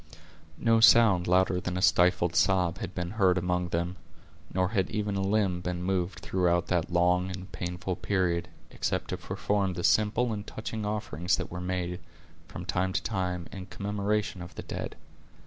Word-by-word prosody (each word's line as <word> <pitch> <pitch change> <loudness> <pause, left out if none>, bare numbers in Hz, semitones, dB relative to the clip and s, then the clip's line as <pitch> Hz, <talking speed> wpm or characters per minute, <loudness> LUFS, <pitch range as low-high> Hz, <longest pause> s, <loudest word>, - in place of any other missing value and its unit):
No 115 -1 +3
sound 110 -6 +6
louder 90 0 +3
than 90 0 -3
a - - -1
stifled 90 -1 +3
sob 90 -1 +2
had 90 - -6
been 90 -1 -3
heard 95 -4 +3
among 90 0 0
them, 85 +2 -2 0.5
nor 90 -1 +1
had 95 -4 0
even 105 -2 -2
a 95 - 0
limb 95 -3 +1
been 90 0 -3
moved 95 0 -1
throughout 90 -2 +1
that 85 -3 +1
long 90 +1 +2
and 95 0 -7
painful 90 0 -4
period, 90 -2 0 0.2
except - - -2
to - - -2
perform 100 -2 -1
the 90 - -4
simple 110 +4 +3
and 105 -1 -6
touching 110 -1 -5
offerings 95 -4 -1
that - - -5
were 90 +1 -5
made, 90 -1 -2 0.5
from - - -8
time 95 +1 0
to - - -1
time, 90 -5 -2
in 95 -2 -8
commemoration 100 0 -2
of 90 - -9
the - - -6
dead. - - -5
90 Hz, 175 wpm, -29 LUFS, 90-100 Hz, 0.5 s, sound